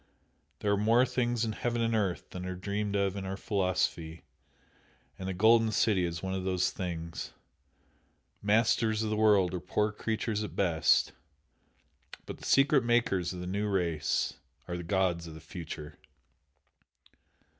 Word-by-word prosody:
"There 105 - +1
are 100 - +3
more 115 +5 +4
things 120 -2 0
in 110 - -2
heaven 120 +2 -2
and 115 0 +1
earth 100 -5 -1
than 90 - -6
are 90 - -4
dreamed 100 +2 -3
of 100 -1 +1
in 100 - -4
our 95 0 -4
philosophy," 90 -5 -1 1.0
and 95 0 -4
the - - -2
"Golden 110 +3 +5
City" 100 -4 +2
is 85 0 -4
one 95 0 -2
of 95 -1 -2
those 90 -1 +1
things! 85 -3 -5 1.1
"Masters 110 +1 +2
of 110 - -2
the - - +1
world" 105 -4 +4
are 90 - -2
poor 105 +4 0
creatures 110 0 -2
at 105 - -7
best, 80 -6 +3 1.1
but - - -8
the - - -10
secret 135 -1 +4
Makers 120 -7 +1
of 90 -1 -6
the - - -5
New 100 +3 -1
Race 85 -6 0 0.3
are 90 - -3
the 90 - -4
gods 85 -1 0
of 80 - -9
the - - -9
Future! 80 -4 -8
100 Hz, 160 wpm, -30 LUFS, 90-110 Hz, 1.1 s, Golden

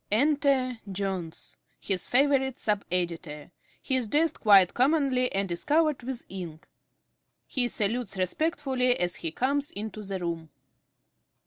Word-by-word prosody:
_) - - -50
Enter 265 0 +2
Jones, 190 -4 -4 0.2
_his 190 -3 -2
favourite 265 0 +2
sub 210 -2 -1
editor. 170 -4 -3 0.3
He 265 - 0
is 250 -3 +1
dressed 310 +6 +1
quite 195 -5 +6
commonly, 260 -2 +2
and 195 -1 -1
is 170 - -3
covered 305 -2 +2
with 245 0 -5
ink. 170 -5 -8 0.8
He 250 -2 +1
salutes 225 -2 -1
respectfully 260 - 0
as 175 0 0
he 165 - -3
comes 275 - 0
into 215 +1 -6
the 195 -1 -4
room. 170 -3 -4
225 Hz, 135 wpm, -27 LUFS, 185-270 Hz, 0.8 s, quite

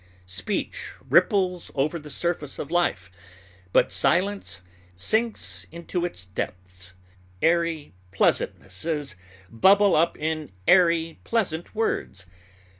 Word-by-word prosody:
Speech 95 +1 -3 0.2
ripples 180 -3 +3
over 150 +4 0
the 150 0 -11
surface 150 -1 -2
of 150 - -6
life, 100 - 0 0.6
but - - +4
silence 185 - +1 0.3
sinks 220 - -1
into 170 +1 -3
its 95 - -6
depths. 90 0 -7 0.5
Airy 165 - +1 0.2
pleasantnesses 135 - -1 0.4
bubble 195 - +5
up 165 +2 +2
in 155 -3 -3 0.2
airy, 170 -3 +4
pleasant 185 -6 -1
words. 155 - -2
160 Hz, 100 wpm, -25 LUFS, -, 0.6 s, bubble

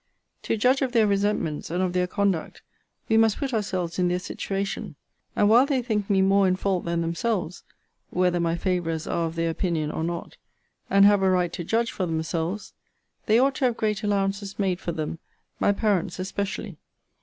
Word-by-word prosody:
To 225 - -1
judge 255 +5 +3
of 260 -2 -1
their 225 -3 +5
resentments, 200 -6 0
and 175 +3 0
of 180 -1 -1
their 180 0 +1
conduct, 195 -3 -1 0.4
we 220 - +3
must 225 -2 +4
put 270 -3 -3
ourselves 185 -5 -2
in 180 - +3
their 175 0 +1
situation: 195 +2 -4 0.4
and 205 - +3
while 240 +5 +6
they 265 -4 0
think 215 -4 -1
me 195 -2 +4
more 195 0 +4
in 185 - +2
fault 190 -1 -1
than 170 0 0
themselves, 180 +1 -2 0.5
(whether 180 -1 +1
my 170 -1 +1
favourers 170 -3 -1
are 165 -1 -1
of 165 - -7
their 165 0 0
opinion, 160 -3 -1
or 160 - -3
not,) 170 0 -4 0.5
and 200 0 +6
have 205 -1 +5
a 190 - +3
right 180 -2 +1
to 175 - -4
judge 230 +6 0
for 185 - -2
themselves, 165 +4 -3 0.5
they 220 - +5
ought 270 +3 +3
to 265 - +1
have 240 -2 +1
great 210 -2 -1
allowances 200 -1 -1
made 190 -3 0
for 175 - -3
them; 160 0 -4 0.4
my - - +3
parents 200 -3 0
especially. 195 +2 -4
190 Hz, 190 wpm, -25 LUFS, 170-210 Hz, 0.5 s, while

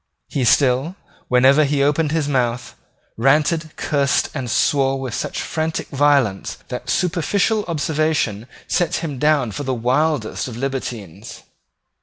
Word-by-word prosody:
He 135 -3 -1
still, 135 +7 +3 0.3
whenever 130 +4 +5
he 140 -1 +1
opened 150 +1 +1
his 160 -2 0
mouth, 125 -3 -1 0.4
ranted, 150 +6 +2
cursed 140 -2 0
and 130 -5 -4
swore 135 +3 +2
with 130 -4 -5
such - - -3
frantic 160 0 -3
violence 140 -8 +1
that 125 - -6
superficial 195 +4 +1
observers 155 - -1 0.2
set 175 - 0
him 145 -6 -4
down 150 -6 +2
for 125 - -5
the 130 -2 -2
wildest 130 +1 0
of 120 -3 -7
libertines. 115 -7 -6
140 Hz, 130 wpm, -20 LUFS, 125-155 Hz, 0.4 s, whenever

